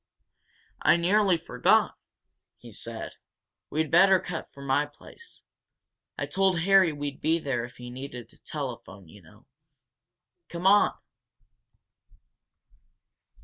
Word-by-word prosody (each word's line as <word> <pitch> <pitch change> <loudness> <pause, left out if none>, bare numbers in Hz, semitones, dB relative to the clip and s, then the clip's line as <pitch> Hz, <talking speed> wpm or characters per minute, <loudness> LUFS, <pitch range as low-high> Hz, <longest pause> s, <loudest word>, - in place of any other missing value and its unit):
"I - - +5
nearly 190 +1 +3
forgot!" 125 -7 +2 0.6
he - - -14
said. - - -7 0.5
"We'd 155 -1 -1
better 190 +2 +6
cut 175 -1 -6
for 140 - -13
my 140 +2 +1
place. 450 - -14 0.7
I - - -2
told 190 -3 +1
Harry 190 -1 +5
we'd 145 -1 -6
be 160 +1 +2
there 135 -7 -2
if 125 - -14
he 125 0 -9
needed 125 -2 -9
a - - -18
telephone, 95 -2 -7
you 100 +5 -16
know. 80 - -20 1.0
Come 170 +1 -6
on!" 205 +2 +5
160 Hz, 115 wpm, -27 LUFS, 130-185 Hz, 1.0 s, better